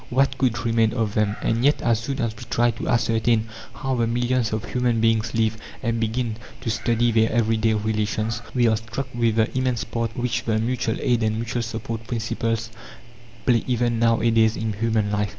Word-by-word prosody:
What 135 +2 +2
could 120 -3 0
remain 115 -1 +2
of 115 -4 -1
them? 105 -1 +1
And 115 +2 +1
yet, 145 +2 +4
as 115 -3 +2
soon 135 +4 -3
as 115 -2 -1
we 105 - -13
try 120 0 +3
to - - -6
ascertain 115 -1 +2 0.2
how 135 -2 -3
the 120 -2 +1
millions 120 -1 0
of 110 -1 -2
human 125 -2 0
beings 115 0 +1
live, 110 -1 +1 0.3
and 115 -1 0
begin 115 0 -1 0.2
to 115 - -1
study 120 +1 +1
their 110 0 +3
everyday 110 -1 +2
relations, 110 +1 -1
we 120 -2 +4
are 110 -1 +3
struck 115 +4 -5
with 115 -2 +1
the 110 +1 +1
immense 130 -3 0
part 115 0 -3
which 125 0 -1
the 110 -2 +1
mutual 115 0 -1
aid 120 -2 +1
and 110 -1 +1
mutual 115 +2 -2
support 115 0 -5
principles 115 -1 -2 0.7
play 120 -3 +3
even 120 -2 +1
now 115 0 +3
a 115 +1 +3
days 110 0 +3
in 110 -1 -2
human 110 -1 0
life. 105 -1 0
115 Hz, 200 wpm, -23 LUFS, 110-120 Hz, 0.7 s, yet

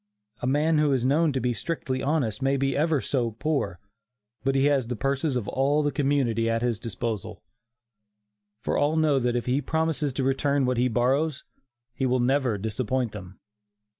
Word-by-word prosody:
A - - -1
man 150 +4 +2
who 150 -1 +3
is 125 -2 0
known 150 +4 +3
to 135 - -1
be 125 0 0
strictly 130 0 -3
honest, 135 -6 0
may 135 +1 +2
be 135 0 0
ever 155 -2 +2
so 125 -4 0
poor, 115 - -2 0.6
but 135 +1 +1
he 135 +1 +3
has 140 -4 +2
the 125 - -3
purses 135 +3 -1
of 120 -5 -2
all 145 +3 +1
the 145 - +1
community 130 -5 +1
at 115 +1 0
his 120 -3 0
disposal; 115 -2 -5 1.2
for - - -1
all 145 +2 +2
know 155 -3 +3
that 120 -1 0
if 120 - -1
he 130 +3 +1
promises 160 -2 -1
to 135 - -1
return 135 +1 +1
what 125 -1 0
he 125 +1 +3
borrows, 130 +5 +1 0.5
he 135 - -1
will 130 0 +2
never 125 -3 +1
disappoint 115 +3 -2
them. 95 -3 -10
135 Hz, 185 wpm, -26 LUFS, 120-145 Hz, 1.2 s, who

